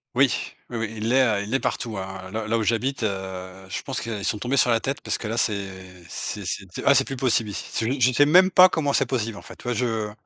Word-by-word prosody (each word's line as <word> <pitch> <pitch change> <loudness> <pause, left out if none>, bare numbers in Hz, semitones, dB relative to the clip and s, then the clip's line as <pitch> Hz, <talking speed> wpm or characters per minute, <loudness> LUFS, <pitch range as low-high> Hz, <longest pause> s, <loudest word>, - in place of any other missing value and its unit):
Oui. 135 0 +5 0.4
Oui, 120 - -4
oui, 110 -1 -3
il 110 +2 -1
est, 130 +1 +5 0.2
heu, - - -4
il 105 - -6
est - - +3
partout, 115 -7 -3
hein. 95 0 -6
Là 110 0 -3
là 115 +1 +1
où - - 0
j'habite, 120 +6 0
heu, 95 -2 -4
je - - -4
pense 135 - -4
qu'ils 110 -3 -5
sont 105 - 0
tombés 125 +6 -1
sur 125 - +4
la 115 -1 +3
tête 135 +5 -3
parce - - -2
que 110 - -6
là, 115 +2 -3
c'est 100 -4 0 0.4
c'est 100 +3 -5
c'est 95 +2 -3
t 90 - -7
ah, 140 - +7
c'est 135 - +4
plus 135 - -5
possible 120 -4 +1
ici. 100 - -5
C'est 110 - -1
u 130 +4 -1
je 125 +1 +5
sais 145 +4 +5
même 185 +5 +6
pas 185 0 +8
comment 145 -5 0
c'est 135 -2 +2
possible, 115 -4 -2
en - - -12
fait. - - -12
Tu - - -16
vois 125 - -1
je 110 -2 -1
115 Hz, 285 wpm, -24 LUFS, 105-130 Hz, 0.4 s, pas